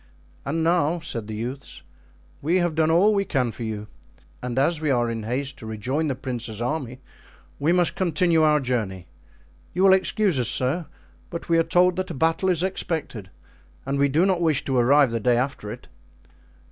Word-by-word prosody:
"And 160 +4 -1
now," 170 0 +2
said 115 -9 -5
the 110 - -5
youths, 125 +5 -6 0.6
"we 165 +6 +2
have 175 -2 +1
done 160 0 +2
all 185 +6 +4
we 200 -1 +1
can 130 -10 -1
for 110 - -12
you; 110 -2 -4 0.6
and 125 0 -4
as 155 +4 +2
we 155 - 0
are 120 -3 +1
in 115 -1 -4
haste 130 +5 -3
to 110 - -9
rejoin 125 +9 -2
the 135 - -1
prince's 120 -4 -5
army 130 0 -3 0.6
we 150 +4 +2
must 175 -1 +2
continue 175 -2 +2
our 150 -1 +4
journey. 110 -9 -2 0.7
You 185 - +2
will 195 -1 +7
excuse 190 -4 +1
us, 120 - +1
sir, 145 +7 -1 0.4
but 170 0 -7
we 165 0 +4
are - - +4
told 180 +2 +3
that 185 0 -2
a - - -5
battle 165 +6 +1
is 175 -2 +2
expected 160 - -3 0.6
and 140 +1 -1
we 140 0 +3
do 160 +7 +3
not 185 -3 +1
wish 155 -4 +1
to 135 - -1
arrive 135 +2 +4
the 115 - -1
day 120 +2 +2
after 125 -4 -2
it." - - -9
145 Hz, 195 wpm, -24 LUFS, 120-170 Hz, 0.7 s, will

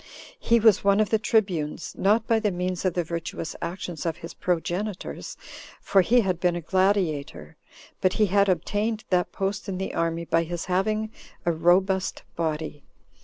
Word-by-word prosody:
He 235 - +3
was 220 -3 +5
one 200 +1 +4
of 215 - +1
the 220 - +3
tribunes, 190 -10 0
not 215 +3 +2
by 225 0 +3
the 215 -1 +1
means 180 0 -3
of 185 - +1
the 175 - +1
virtuous 165 0 -5
actions 175 -2 -5
of 165 -2 -2
his 165 - -9
progenitors, 180 +3 -3 0.4
for 195 - +3
he 240 +6 +4
had 185 -5 -1
been 175 -1 +2
a 175 - -3
gladiator, 165 - 0 0.5
but 185 -1 +3
he 215 - +3
had 200 0 +3
obtained 210 +5 0
that 180 -1 +2
post 195 +1 -3
in 185 - -3
the 190 - -3
army 165 0 -1
by 165 0 +2
his 170 0 -4
having 215 +4 0 0.3
a 170 - +3
robust 185 +3 +2
body. 155 -2 -3
185 Hz, 170 wpm, -25 LUFS, 170-205 Hz, 0.5 s, was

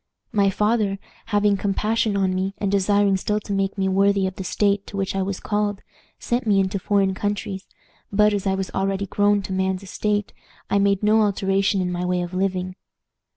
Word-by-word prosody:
"My 200 -2 +3
father, 210 0 +1 0.3
having 205 -1 +2
compassion 210 +2 0
on 190 -1 +1
me, 190 +1 -2
and 200 -2 -1
desiring 200 0 +3
still 210 +2 -1
to 200 - -5
make 195 +1 -1
me 190 0 +1
worthy 195 +1 +2
of 185 - -2
the 190 - -5
state 200 +1 0
to 200 - -7
which 195 0 -2
I 195 - 0
was 190 0 -3
called, 205 -1 -2 0.3
sent 240 0 -2
me 200 -2 +4
into 195 +1 0
foreign 195 0 +1
countries; 200 -1 -3 0.4
but, 210 +1 +4
as 200 -1 -1
I 190 - +2
was 190 -1 -4
already 195 +1 -1
grown 205 +1 +2
to 190 - -5
man's 190 0 -1
estate, 205 +2 -2 0.4
I 200 - +3
made 200 0 +2
no 215 +1 +4
alteration 195 -1 +1
in 180 -1 -1
my 175 0 -2
way 180 0 0
of 175 +1 -7
living. 185 0 -2
195 Hz, 200 wpm, -23 LUFS, 190-205 Hz, 0.4 s, me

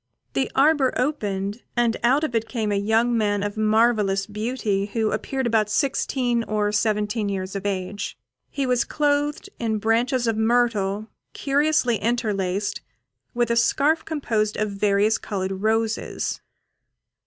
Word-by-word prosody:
The 265 - 0
arbour 280 -1 +4
opened, 205 -6 -2 0.2
and 235 -1 +2
out 265 +6 +3
of 305 - -1
it 225 -1 0
came 220 -4 -1
a - - +1
young 220 +4 +2
man 205 -2 +1
of 205 0 -3
marvellous 215 -3 +2
beauty, 210 -2 -2
who 220 -2 +1
appeared 265 -1 -2
about 220 -3 +2
sixteen 245 -1 0
or 210 -1 0
seventeen 210 0 0
years 190 0 -4
of 195 +1 -2
age. 195 +1 -4 0.3
He 275 - -2
was 250 -2 +2
clothed 295 +4 0
in 225 -2 0
branches 235 +4 +1
of 225 -1 +1
myrtle, 220 -3 +1 0.2
curiously 280 -4 +1
interlaced, 205 -3 -1 0.5
with 240 -1 +1
a - - +2
scarf 290 +7 +2
composed 225 -9 -1
of 215 -1 -1
various 200 +2 +2
coloured 190 -1 -4
roses. 225 +1 -1
220 Hz, 140 wpm, -23 LUFS, 205-245 Hz, 0.5 s, arbour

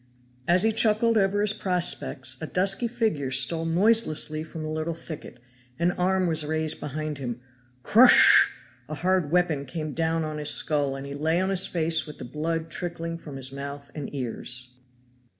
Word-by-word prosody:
As 175 +1 +5
he 220 - +3
chuckled 220 +1 +2
over 200 -1 +1
his 210 0 +3
prospects 175 -9 -1
a 160 - -4
dusky 195 +7 +1
figure 220 - -2
stole 150 +5 +2
noiselessly 165 -4 +2
from 160 0 -8
a 155 - -5
little 155 +1 -3
thicket 155 -6 -9 0.4
an 170 +3 +1
arm 185 +1 0
was 160 -2 +1
raised 155 +1 -1
behind 150 0 -5
him 120 -3 -5 0.4
crosssh! 250 +4 +7 0.4
a 155 - -4
hard 180 -1 0
weapon 170 -4 +1
came 155 +2 -6
down 165 0 0
on 155 -1 -5
his 150 - +1
skull, 145 -3 +2
and 135 0 -7
he 140 - -7
lay 160 +4 0
on 190 +1 -1
his 190 -1 +2
face 160 -2 +1
with 150 - -10
the - - -8
blood 160 +4 -4
trickling 165 -1 -5
from 150 -4 -10
his 130 -1 -1
mouth 140 +1 -8
and 150 -3 -7
ears. 125 -1 -3
160 Hz, 175 wpm, -25 LUFS, 145-180 Hz, 0.4 s, crosssh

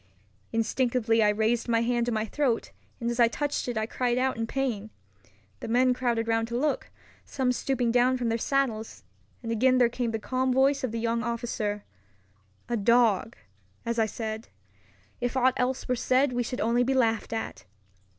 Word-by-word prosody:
Instinctively 230 0 +1
I 210 - +5
raised 220 +3 +1
my 230 -1 +3
hand 240 0 0
to - - 0
my 220 -1 0
throat, 245 -1 -1 0.3
and 235 0 -1
as 240 - -4
I 235 - +7
touched 290 +4 -2
it 240 -2 -2
I 220 - 0
cried 245 +1 -1
out 260 +1 +1
in 225 0 -3
pain. 230 -6 -2 0.7
The - - -6
men 250 +2 +3
crowded 240 -2 -1
round 225 0 +1
to 235 +1 -3
look, 295 +3 -1 0.3
some 260 -2 -1
stooping 250 -1 0
down 250 +2 +3
from 240 -2 -1
their 230 +1 0
saddles; 225 - -1 0.4
and 230 - -3
again 255 +3 +3
there 245 -2 +4
came 240 0 -2
the 225 - -2
calm 255 +3 -1
voice 270 +2 +3
of 255 - -1
the 230 - -3
young 230 0 0
officer, 225 -3 -3 0.8
"A 240 0 -1
dog, 230 0 +3 0.5
as 235 0 -1
I 220 - +3
said. 220 +1 -5 0.7
If 245 +1 -2
aught 260 0 +4
else 255 +1 -1
were 250 - +1
said 255 +2 +2
we 245 - 0
should 250 +1 -3
only 235 +2 +2
be 265 +2 0
laughed 225 -3 +1
at." 220 - -5
235 Hz, 190 wpm, -27 LUFS, 225-255 Hz, 0.8 s, I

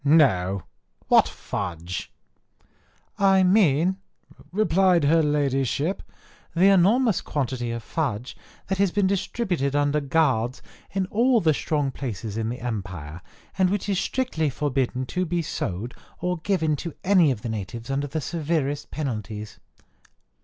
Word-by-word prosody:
no: 100 - +3 0.5
what - - +6
fudge?" 90 -3 -5 1.1
"I 195 -1 +5
mean," 180 -2 +3 0.5
replied 185 -3 +3
her 160 +3 +4
Ladyship, 145 - 0 0.5
"the 190 +4 +6
enormous 205 +4 +4
quantity 130 -4 -2
of 115 -1 -4
fudge 125 -6 -3 0.3
that 190 0 -2
has 200 -1 +4
been 200 +2 +1
distributed 185 - -1
under 145 +1 +2
guards 135 -5 +1 0.3
in 190 -1 -1
all 240 +2 +4
the 160 -5 +3
strong 145 -1 -1
places 110 -6 -5
in 110 0 -1
the 125 +2 -5
empire, 95 -9 -5 0.4
and 185 -1 +4
which 205 +1 -1
is 195 -2 +1
strictly 220 - -1
forbidden 130 -2 -1
to 180 +8 -2
be 175 -1 -1
sold 110 - -4 0.3
or 180 0 -1
given 160 -4 +1
to 170 +2 -6
any 185 -5 +5
of 120 -6 -2
the 120 - -3
natives 110 +3 -5
under 140 +1 -1
the 155 +3 -3
severest 150 -2 -2
penalties." 110 -7 -5
145 Hz, 135 wpm, -25 LUFS, 120-180 Hz, 1.1 s, what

